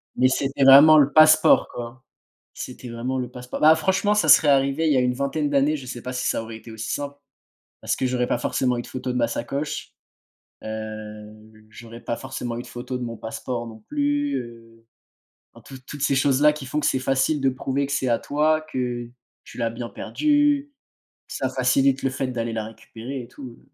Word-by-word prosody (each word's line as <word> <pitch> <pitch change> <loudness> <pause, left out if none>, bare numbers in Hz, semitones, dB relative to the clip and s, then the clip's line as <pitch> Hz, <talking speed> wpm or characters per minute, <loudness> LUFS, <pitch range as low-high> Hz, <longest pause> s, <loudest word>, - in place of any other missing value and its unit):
mais 130 - +4
c'était 135 +1 0
vraiment 145 +4 +9
le 145 -1 +4
passeport 155 0 +6
quoi, 120 +2 -8 0.5
c'était 125 0 -8
vraiment 125 +3 -3
le 125 -1 -3
passeport. 125 0 -8
Bah, 155 +1 +7
franchement, 190 +5 +1
ça 175 -7 +1
serait 150 0 +7
arrivé 140 +3 +2
il - - +3
y - - +2
a - - +4
une 125 0 +1
20aine 145 +2 -2
d'années, 145 +2 +2
je 130 -3 -10
sais 120 -1 -7
pas 125 - -5
si 125 - -3
ça - - 0
aurait 110 0 -8
été 115 0 -12
aussi 110 0 -5
simple. 145 0 -4 0.7
Parce - - -1
que 130 - -2
j'aurais 125 -1 0
pas - - 0
forcément 125 0 -1
eu - - -2
de - - -13
photo 130 0 -5
de 125 - -2
ma 115 -1 +2
sacoche, 140 +6 -4 0.7
heu, 110 0 -9
j'aurais 115 +1 -12
pas 115 - -3
forcément 125 -3 -5
eu - - -4
de - - -13
photo 125 +1 -6
de 125 - -6
mon 115 -1 -6
passeport 120 +1 -5
non 110 -1 -11
plus, 290 0 0
heu 115 -1 -11 0.7
enfin 115 - -17
toutes 130 -1 -12
toutes 145 -2 -8
ces 140 - +2
choses 135 0 +2
là, 150 0 +6
qui 145 -3 -8
font 150 +4 -2
que - - -1
c'est 130 - +1
facile 135 +3 0
de 135 - +2
prouver 135 +2 -2
que 140 - -6
c'est 135 -2 0
à 115 - +2
toi, 155 +2 +1
que 120 -2 -3 0.4
tu - - -13
l'as 115 -1 0
bien 115 +1 -6
perdu. 290 - +1 0.6
Ça 130 - -3
facilite 135 +1 +2
le 135 - +1
fait 130 0 -3
d'aller 115 -2 -3
la 110 -1 -3
récupérer 115 +4 -8
et 120 - -11
tout. 125 -2 -11
130 Hz, 215 wpm, -23 LUFS, 120-145 Hz, 0.7 s, vraiment